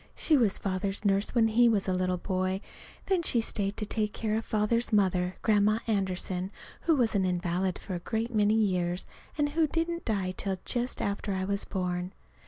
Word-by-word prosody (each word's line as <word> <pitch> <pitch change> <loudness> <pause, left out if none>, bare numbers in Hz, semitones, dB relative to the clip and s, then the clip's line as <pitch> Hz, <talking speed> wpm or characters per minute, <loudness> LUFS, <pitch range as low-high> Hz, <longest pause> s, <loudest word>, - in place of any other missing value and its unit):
She 315 - +3
was 230 -8 +3
Father's 195 +1 -2
nurse 200 +4 +1
when 225 -2 +4
he 235 +2 +5
was 205 -4 +1
a 185 - +1
little 185 0 0
boy; 185 +1 -1 0.5
then 380 -3 +2
she 250 -7 +3
stayed 205 -3 -1
to 215 - -2
take 210 0 -1
care 215 -1 -1
of 225 - -1
Father's 225 +3 +1
mother, 185 -3 +2
Grandma 215 0 +4
Anderson, 190 -3 -1 0.4
who 325 - +5
was 240 -5 +2
an 200 -2 +2
invalid 180 0 0
for 195 - -7
a 175 - -2
great 225 +6 -3
many 210 0 +3
years 180 -4 0 0.3
and 295 -1 +2
who 315 +1 +2
didn't 335 +2 -2
die 195 -4 -1
till 190 0 -2
just 245 0 -1
after 200 0 -2
I 190 0 -1
was 200 +1 0
born. 180 -1 -3
200 Hz, 190 wpm, -29 LUFS, 185-225 Hz, 0.5 s, he